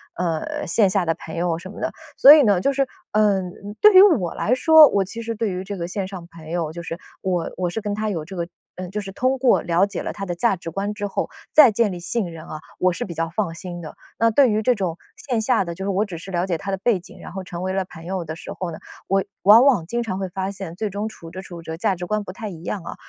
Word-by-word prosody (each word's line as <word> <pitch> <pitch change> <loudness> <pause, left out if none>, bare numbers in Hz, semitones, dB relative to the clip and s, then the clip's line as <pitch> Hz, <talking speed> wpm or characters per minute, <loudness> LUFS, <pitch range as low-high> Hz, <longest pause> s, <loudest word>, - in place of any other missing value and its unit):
呃， 180 - -2
线 210 -4 +3
下 185 -1 +1
的 165 0 0
朋 160 - -9
友 170 -1 0
什 185 +3 -9
么 - - -10
的。 - - -2 0.3
所 285 - +10
以 305 -2 +7
呢， 205 -6 +3
就 275 - +1
是， 275 0 +2 0.3
嗯， 205 -3 +2 0.2
嗯， 205 +1 -8
对 425 0 +8
于 375 - +10
我 285 - +4
来 225 - 0
说， 315 +3 +8
我 200 - +2
其 230 +5 -6
实 230 0 -3
对 220 0 -1
于 185 0 -4
这 200 +1 -6
个 170 -1 -3
线 190 +1 -3
上 190 -3 -8
朋 165 -2 -13
友， 165 -2 -2
就 170 +2 -7
是 165 0 -5 0.2
我 180 -3 -1
我 180 -1 -1
是 200 - -3
跟 205 -1 -3
他 215 +1 -2
有 165 -6 -3
这 190 +4 -9
个 170 -1 -3 0.3
嗯， 185 0 -6
就 210 - -3
是 195 -1 -7
通 255 +6 0
过 255 -1 +3
了 175 +2 +2
解 200 -3 -5
了 - - -4
他 195 - -5
的 180 - -3
价 230 +3 +2
值 170 -2 -7
观 200 +4 -2
之 205 -1 -3
后， 195 - -3 0.2
再 300 -5 +9
建 215 -1 +1
立 180 - -6
信 180 +1 -2
任 165 -1 -10
啊， 155 - -7 0.2
我 185 - +3
是 175 - -4
比 175 - -7
较 165 0 -2
放 175 0 -2
心 175 +1 -7
的。 155 - -9 0.2
那 230 0 +3
对 265 +3 +5
于 215 0 +1
这 250 - +4
种 185 -7 -3 0.3
线 240 -3 +1
下 230 -1 +2
的， 170 -2 -6
就 190 +2 -5
是 - - -1
我 200 +2 +1
只 185 -5 -7
是 175 +4 -9
了 175 0 0
解 175 -3 0
他 195 +5 -5
的 195 - -1
背 205 0 +1
景， 175 - -15
然 - - -9
后 190 +1 -6
成 175 -1 -7
为 185 0 -2
了 190 -1 -1
朋 165 -2 -12
友 185 -1 -3
的 160 0 -5
时 - - -9
候 180 -2 -4
呢， 160 - -8 0.3
我 195 0 +2 0.2
往 215 +5 +8
往 245 -13 +4
经 235 +7 -2
常 200 -5 -3
会 190 - -2
发 190 +1 -3
现， 190 -4 -7
最 215 +3 -2
终 205 +2 -3
处 170 -6 -10
着 185 +2 -7
处 175 -3 -9
着 160 0 -6
价 195 +1 +1
值 180 0 -6
观 215 +1 -1
不 185 - -7
太 215 +2 -6
一 170 -4 -10
样 190 +2 -3
啊。 - - -7
190 Hz, 315 characters per minute, -22 LUFS, 175-215 Hz, 0.3 s, 所